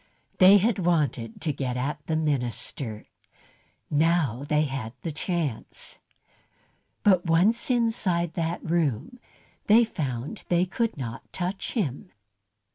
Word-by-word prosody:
They 190 +1 +9
had 210 +1 +1
wanted 145 -10 0
to 155 - -1
get 130 -2 -3
at 145 +3 -3
the 160 - 0
minister, 125 -6 -2 0.9
now 150 -5 +2
they 150 0 +3
had 130 -5 -4
the 165 - -2
chance. 155 - -3 1.0
But 185 -4 +4
once 190 +11 +3
inside 215 -9 +1
that 165 0 -3
room, 160 - 0 0.5
they 230 +3 +7
found 140 - -4
they 175 +1 +3
could 225 +3 -2
not 120 -4 -7
touch 185 +2 -3
him. 140 - -2
160 Hz, 120 wpm, -26 LUFS, 135-185 Hz, 1.0 s, They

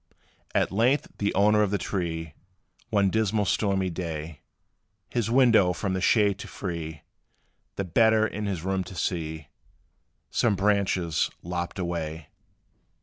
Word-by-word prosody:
At - - +2
length, 120 +8 +2
the 100 - +1
owner 105 +2 +4
of 105 - +2
the 100 - 0
tree 80 -5 -3 0.6
One 100 -4 +2
dismal, 110 -1 +1
stormy 95 -1 +1
day, 80 -3 -5 0.7
His 115 -3 0
window 115 -7 +5
from 95 +1 -2
the 95 - -1
shade 100 0 +3
to - - -7
free, 80 -5 -5 0.7
The 100 - -2
better 110 +4 +4
in 105 -1 -3
his 90 -5 -3
room 95 0 0
to 95 - -10
see, 80 -4 -3 0.8
Some 110 -4 +2
branches 95 -5 +1
lopped 85 +1 -4
away. 80 -4 -4
95 Hz, 135 wpm, -26 LUFS, 85-105 Hz, 0.8 s, window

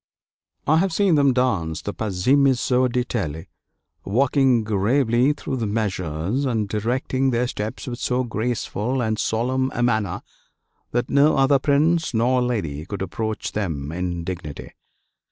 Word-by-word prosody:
I 155 +3 +4
have 190 +3 +2
seen 195 +1 +2
them 140 -3 +4
dance 100 -11 0
the 105 - -4
'Pazzemezzo 125 +4 +2
d'Italie,' 105 -11 -2 0.5
walking 130 +2 +2
gravely 120 +5 +2
through 140 -2 -4
the 115 -3 -2
measures, 100 - -2
and 115 -6 0
directing 125 +5 0
their 120 0 +1
steps 110 -3 -5
with 120 -1 -5
so 130 -1 0
graceful 120 +1 -2
and 110 -3 -1
solemn 130 +4 0
a 120 - 0
manner 110 -4 0 0.7
that 120 +1 -2
no 140 +2 +4
other 135 0 +4
prince 155 +2 +2
nor 125 +3 +2
lady 95 -13 -2
could 100 -1 -4
approach 110 +3 -3
them 80 -9 -3
in 85 0 -3
dignity. 85 -5 -6
120 Hz, 135 wpm, -22 LUFS, 100-130 Hz, 0.7 s, I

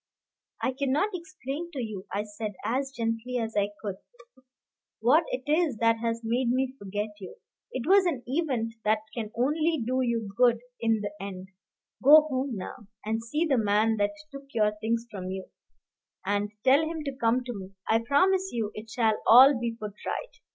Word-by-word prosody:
"I - - +2
cannot 280 +9 0
explain 315 -2 -6
to 275 - -4
you," 215 -5 -5
I 205 - -1
said, 210 0 -6
as 270 +3 -1
gently 230 0 -2
as 225 -2 -3
I 205 -1 +2
could, 200 -3 -3 1.0
"what 290 +9 +4
it 255 - -3
is 305 -4 +1
that 230 0 +3
has 230 0 -2
made 235 +2 0
me 260 +1 0
forget 205 +2 -3
you. 185 -3 -9 0.4
It 255 -1 -4
was 385 0 +6
an 275 -8 -2
event 255 -5 -1
that 215 0 +2
can 225 -3 -4
only 305 +6 +1
do 255 +2 0
you 230 -5 -1
good 240 +1 +5 0.2
in 225 -2 +1
the 205 -1 -3
end. 190 -1 -7 0.5
Go 300 +4 +9
home 265 -4 -2
now, 200 +3 -8 0.2
and 220 +1 -1
see 300 +8 0
the 275 -6 +2
man 215 +1 +2
that 205 +6 +1 0.2
took 275 0 -10
your 210 -1 +2
things 230 +1 0
from 185 -2 -6
you, 190 0 -6 0.7
and 205 +1 0
tell 270 +3 +6
him 320 -1 -3
to 275 -2 -4
come 245 0 +1
to 245 0 -5
me. 195 -2 -9
I 225 - +4
promise 370 +11 +2
you 220 -3 -2
it 215 +1 -9
shall 220 -2 +1
all 260 +5 +9
be 235 -1 -2
put 210 -2 -5
right." - - -4
235 Hz, 185 wpm, -28 LUFS, 215-275 Hz, 1.0 s, Go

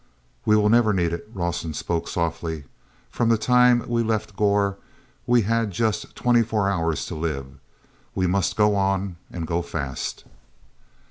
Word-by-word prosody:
"We 105 - +5
will 105 -1 +3
never 115 -1 +4
need 85 -3 +1
it," 85 +5 -6
Rawson 85 -5 -3
spoke 85 -1 -2
softly. 80 -2 -2 0.5
"From 120 -2 +1
the 115 - +4
time 125 +1 +4
we 120 -1 +1
left 110 -2 -2
Gor 100 -1 +2 0.5
we 120 -2 +4
had 115 +1 +1
just 110 +3 -2
twenty 120 -1 +3
four 110 -3 0
hours 85 -5 0
to - - -6
live. 70 -5 -4 0.6
We 95 - +1
must 90 +1 +1
go 105 -1 +4
on, 95 -2 0
and 85 -2 -5
go 85 +1 -1
fast." 70 -6 -4
100 Hz, 155 wpm, -24 LUFS, 85-110 Hz, 0.6 s, We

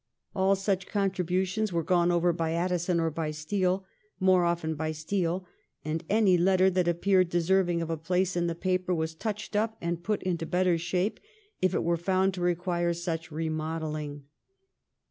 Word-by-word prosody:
All 190 +1 +3
such 195 -1 -1
contribu 190 -2 0
tions 215 +2 -2
were 170 -1 0
gone 175 0 +3
over 175 0 +3
by 165 -1 -1
Addison 175 0 0
or 165 -1 +1
by 160 0 -2
Steele 185 +5 -1 0.2
— 215 - -41
more 180 -2 +5
often 170 -2 0
by 155 +1 -3
Steele 175 +3 -2 0.2
— - - -43
and 160 +2 -2
any 200 -4 +4
letter 190 +1 +4
that 180 -1 +1
appeared 185 +1 +3
deserv 175 +2 +2
ing 170 -1 0
of 165 - -4
a 165 - -1
place 180 +3 0
in 175 -1 +1
the 170 - -2
paper 185 +1 0
was 160 0 -2
touched 210 +4 -5
up 220 +1 0
and 170 0 -3
put 210 0 -1
into 170 -3 -2
better 180 -1 +2
shape 180 +4 -1 0.4
if 185 0 +2
it - - +1
were 170 0 +1
found 190 +2 +1
to 180 - -5
require 175 -1 0
such 165 -1 -4
remodelling. 155 -2 -3
175 Hz, 185 wpm, -28 LUFS, 165-185 Hz, 0.4 s, more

